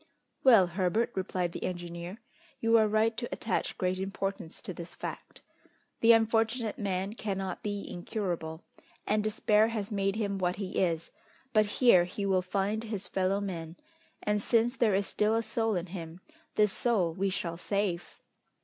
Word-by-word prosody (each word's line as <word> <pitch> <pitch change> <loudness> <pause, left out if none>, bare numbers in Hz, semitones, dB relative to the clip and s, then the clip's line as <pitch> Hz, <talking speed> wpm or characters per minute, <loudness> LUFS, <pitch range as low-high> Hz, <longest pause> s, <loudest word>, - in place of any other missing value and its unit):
"Well, 230 -8 +8
Herbert," 185 +6 0
replied 185 -2 -1
the - - -6
engineer, 175 +1 -5 0.4
"you 230 0 +3
are 215 - +4
right 220 +2 +2
to 240 - -3
attach 210 -5 -2
great 185 0 0
importance 195 -3 -4
to 185 - -5
this 170 0 -8
fact. - - -7 0.6
The 230 - +7
unfortunate 225 0 +2
man 195 -1 -1
cannot 195 -4 -3
be 205 -1 -3
incurable, 175 -4 -4 0.4
and 210 0 +1
despair 215 0 +3
has 220 -3 -3
made 195 -1 0
him 200 -3 -1
what 180 -1 +1
he 195 -2 -3
is; 170 -3 0 0.4
but 215 -1 +5
here 205 -5 +5
he 200 +3 -4
will 190 -2 +3
find 200 +4 -1
his 205 -4 -4
fellow 190 +1 +1
men, 170 -4 -5 0.5
and 210 0 +1
since 235 +3 +2
there 220 -6 +3
is 200 +1 +1
still 210 +3 +1
a 230 - +1
soul 225 -2 0
in 175 -1 -1
him, 170 -2 -7 0.4
this 210 -1 +3
soul 195 -9 +1
we 195 +3 0
shall 170 -2 -3
save!" 185 -1 -2
195 Hz, 165 wpm, -30 LUFS, 180-215 Hz, 0.6 s, Well